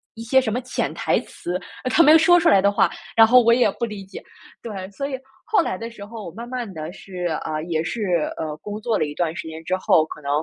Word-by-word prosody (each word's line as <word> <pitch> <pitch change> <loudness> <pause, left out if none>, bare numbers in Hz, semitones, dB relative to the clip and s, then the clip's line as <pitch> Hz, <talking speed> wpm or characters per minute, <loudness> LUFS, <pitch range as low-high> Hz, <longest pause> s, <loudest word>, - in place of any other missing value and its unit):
一 225 - -8
些 265 +3 +4
什 220 -5 -2
么 250 - -1
潜 250 - -3
台 - - +1
词， 175 - -6 0.3
呃 255 - -1
他 - - +5
没 305 - +7
有 - - +9
说 350 +2 +5
出 335 - +1
来 195 - +5
的 200 - +3
话， 205 - +3 0.3
然 225 0 +8
后 250 +2 +7
我 235 0 +4
也 245 -3 +4
不 235 - -7
理 210 -3 -8
解。 195 - -10 0.4
对， 195 -5 -6
所 275 +7 -4
以 265 -2 -5 0.3
后 425 - +3
来 185 - -3
的 230 +4 -6
时 205 -3 -10
候， 220 0 -9
我 - - -7
慢 230 +7 -8
慢 245 -5 -4
地 155 0 -6
是 185 -2 -7 0.2
啊， 155 0 -3
也 160 -1 -1
是， 190 +8 -4 0.4
呃， 155 -2 -4
工 210 +5 -7
作 225 -1 0
了 - - +1
一 145 - -6
段 165 -1 -1
时 200 -4 -6
间 160 0 -8
之 185 - 0
后， 185 -4 +3
可 155 - -10
能 140 - -6
210 Hz, 295 characters per minute, -22 LUFS, 175-240 Hz, 0.4 s, 有